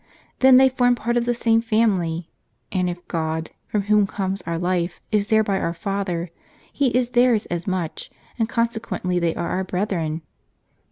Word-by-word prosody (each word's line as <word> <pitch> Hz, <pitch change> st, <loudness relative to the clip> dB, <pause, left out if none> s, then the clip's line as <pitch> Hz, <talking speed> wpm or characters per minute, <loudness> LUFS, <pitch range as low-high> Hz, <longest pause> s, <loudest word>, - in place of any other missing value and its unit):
Then 260 Hz, -1 st, +7 dB
they 265 Hz, +1 st, +7 dB
form 245 Hz, -1 st, +2 dB
part 235 Hz, 0 st, -2 dB
of 240 Hz, -1 st, +1 dB
the 240 Hz, 0 st, +1 dB
same 225 Hz, -1 st, +3 dB
family; 190 Hz, -8 st, 0 dB, 0.4 s
and 180 Hz, -2 st, 0 dB
if 175 Hz, 0 st, -7 dB
God, 160 Hz, -1 st, -2 dB, 0.2 s
from 210 Hz, -2 st, -1 dB
whom 210 Hz, 0 st, +3 dB
comes 195 Hz, -1 st, -3 dB
owr 170 Hz, 0 st, -1 dB
life, 175 Hz, 0 st, -1 dB
is 210 Hz, -2 st, +1 dB
thereby 215 Hz, -3 st, +2 dB
our 170 Hz, -, -2 dB
Father, 180 Hz, -2 st, -3 dB, 0.4 s
He 280 Hz, -, +2 dB
is 250 Hz, 0 st, +1 dB
theirs 245 Hz, -3 st, +3 dB
as 175 Hz, +1 st, -3 dB
much, 185 Hz, -4 st, -3 dB, 0.3 s
and 225 Hz, 0 st, +1 dB
con 230 Hz, 0 st, +2 dB
sequently 180 Hz, -6 st, -3 dB
they 170 Hz, -1 st, +1 dB
are -, -, -3 dB
our 185 Hz, +1 st, -1 dB
brethren." 180 Hz, -4 st, -2 dB
195 Hz, 175 wpm, -22 LUFS, 175-230 Hz, 0.4 s, Then